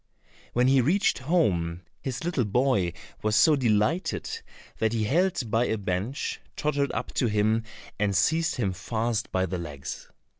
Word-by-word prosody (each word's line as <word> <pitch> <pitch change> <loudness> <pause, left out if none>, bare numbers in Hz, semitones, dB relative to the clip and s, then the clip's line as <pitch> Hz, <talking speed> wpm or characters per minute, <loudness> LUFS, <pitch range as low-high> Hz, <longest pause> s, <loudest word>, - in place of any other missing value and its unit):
When 125 +1 +3
he 135 0 +5
reached 175 +11 +2
home, 95 - +1 0.2
his 130 0 -4
little 165 -7 0
boy 105 -5 +1 0.3
was 105 0 +1
so 150 +8 +6
delighted 125 - +1 0.5
that 110 0 +1
he 110 -2 0
held 145 - +1
by 115 +2 +3
a 110 - 0
bench, 100 +7 -3
tottered 145 -2 0
up - - -4
to 125 - +1
him 110 +1 +2 0.4
and 100 -1 +1
seized 160 - +2
him 100 -7 0
fast 115 +4 -2
by 95 0 +1
the 90 0 -3
legs. 75 -5 -7
115 Hz, 155 wpm, -27 LUFS, 100-140 Hz, 0.5 s, so